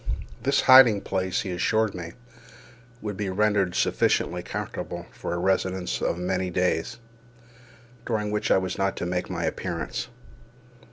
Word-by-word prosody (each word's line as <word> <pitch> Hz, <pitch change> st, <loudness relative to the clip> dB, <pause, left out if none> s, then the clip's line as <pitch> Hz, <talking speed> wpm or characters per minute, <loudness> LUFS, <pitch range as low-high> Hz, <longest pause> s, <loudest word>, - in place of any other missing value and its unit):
This 140 Hz, +3 st, +2 dB
hiding 130 Hz, -6 st, +8 dB
place, 95 Hz, -2 st, -1 dB
he 95 Hz, -, -4 dB
assured 110 Hz, +4 st, +1 dB
me, 85 Hz, -1 st, -7 dB, 0.9 s
would 105 Hz, -2 st, -3 dB
be 100 Hz, 0 st, -3 dB
rendered 100 Hz, -2 st, +1 dB
sufficiently -, -, +1 dB
comfortable -, -, -5 dB
for -, -, -6 dB
a 85 Hz, -, -1 dB
residence 95 Hz, 0 st, 0 dB
of -, -, 0 dB
many 90 Hz, +1 st, -1 dB
days, 90 Hz, +5 st, 0 dB, 1.1 s
during 105 Hz, -3 st, -2 dB
which 105 Hz, -, -1 dB
I -, -, +5 dB
was 95 Hz, 0 st, -3 dB
not 95 Hz, 0 st, 0 dB
to -, -, -3 dB
make 90 Hz, 0 st, -2 dB
my 85 Hz, -3 st, -2 dB
appearance. 85 Hz, +1 st, -3 dB
95 Hz, 145 wpm, -25 LUFS, 90-105 Hz, 1.1 s, hiding